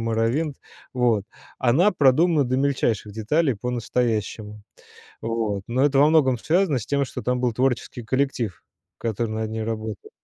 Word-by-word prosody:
"Морровинд", 115 +7 0 0.4
вот 120 -5 +2 0.3
она 135 - +4
продумана 155 +1 +4
до 130 +1 -1
мельчайших 125 -7 0
деталей 130 +6 +1
по-настоящему. 110 -2 -2 0.6
Вот. 110 -4 -2
Но 130 +4 +1
это 140 -1 +3
во 145 - +6
многом 140 -6 +3
связано 165 0 +1
с 110 - -7
тем, 140 -1 +1
что - - -7
там 125 0 0
был 125 -1 +1
творческий 125 0 -1
коллектив, 125 -4 -1 0.4
который 115 0 -2
над 110 0 -3
ней 110 0 -3
работал. 110 -1 -5
125 Hz, 145 wpm, -23 LUFS, 110-140 Hz, 0.6 s, во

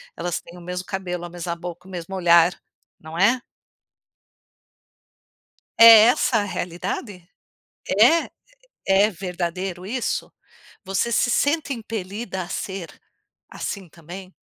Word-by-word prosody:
elas 175 0 -3
têm 170 +1 -14
o 175 - -12
mesmo 180 +1 -5
cabelo, 180 -3 -4
a - - -8
mesma 170 0 -5
boca, 175 +1 -9
o - - -13
mesmo 180 +1 -6
olhar, 170 -1 +4 0.4
não 160 +1 -9
é? 235 +7 +3 2.4
É 230 - +10 0.2
essa 245 -1 +2
a - - 0
realidade? 180 +1 -5 0.8
É? 315 +10 +5 0.6
É 195 +2 +4
verdadeiro 180 0 -4
isso? 250 +3 -3 0.5
Você 195 +5 -1
se 245 +1 +2
sente 290 +2 +1
impelida 210 -4 -5
a 170 - -8
ser, 190 -2 -5 0.6
assim 195 -4 -6
também, 180 +4 -11
185 Hz, 120 wpm, -23 LUFS, 175-205 Hz, 2.4 s, É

